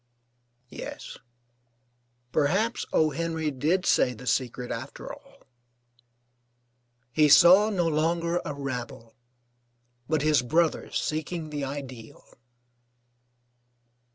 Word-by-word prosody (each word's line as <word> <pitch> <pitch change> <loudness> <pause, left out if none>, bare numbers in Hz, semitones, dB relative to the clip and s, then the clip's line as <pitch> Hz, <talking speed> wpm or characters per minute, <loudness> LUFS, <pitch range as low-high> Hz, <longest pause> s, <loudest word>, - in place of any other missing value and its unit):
Yes, - - -8 1.1
perhaps 190 - 0
O. 155 -1 +2
Henry 160 0 -2
did 160 +8 0
say 125 - +2
the 125 +3 -12
secret 125 0 -2
after - - -7
all: - - -17 1.7
"He 150 +4 +3
saw 185 +7 +7
no 180 -5 0
longer 170 +2 0
a 150 -4 -5
rabble, 125 -4 -6 1.0
but 155 -2 +1
his 155 -2 +3
brothers 160 +6 0
seeking 155 +1 -4
the 145 -1 -4
ideal." 130 -5 -8
155 Hz, 95 wpm, -26 LUFS, 135-170 Hz, 1.7 s, saw